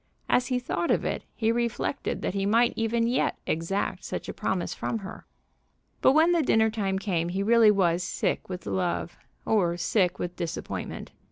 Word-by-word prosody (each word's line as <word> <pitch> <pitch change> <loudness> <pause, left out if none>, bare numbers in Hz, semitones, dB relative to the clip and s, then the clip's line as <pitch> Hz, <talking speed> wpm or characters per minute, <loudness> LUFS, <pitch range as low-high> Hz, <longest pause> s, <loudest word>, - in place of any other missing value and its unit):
As 245 - +2
he 255 - 0
thought 255 +7 -2
of - - +2
it, - - -2
he 225 -1 +1
reflected 235 +3 -2
that - - -1
he 195 0 -1
might 230 +3 +4
even 230 +1 +1
yet 240 +2 +1
exact 165 +5 -2
such - - -5
a - - -4
promise - - -2
from 230 - -3
her. 195 -3 -9 0.7
But 260 - +6
when 320 +3 +5
the 340 -2 +3
dinner 220 -5 +3
time 195 -3 -1
came 175 -4 -1
he 190 +3 -1
really 230 0 +6
was 180 -4 +3
sick 175 - -2
with 180 -1 -6
love, 180 -2 -2 0.3
or 175 -6 +2
sick 180 -1 +1
with 175 0 -4
disappointment. 170 -2 -5
210 Hz, 180 wpm, -27 LUFS, 180-235 Hz, 0.7 s, But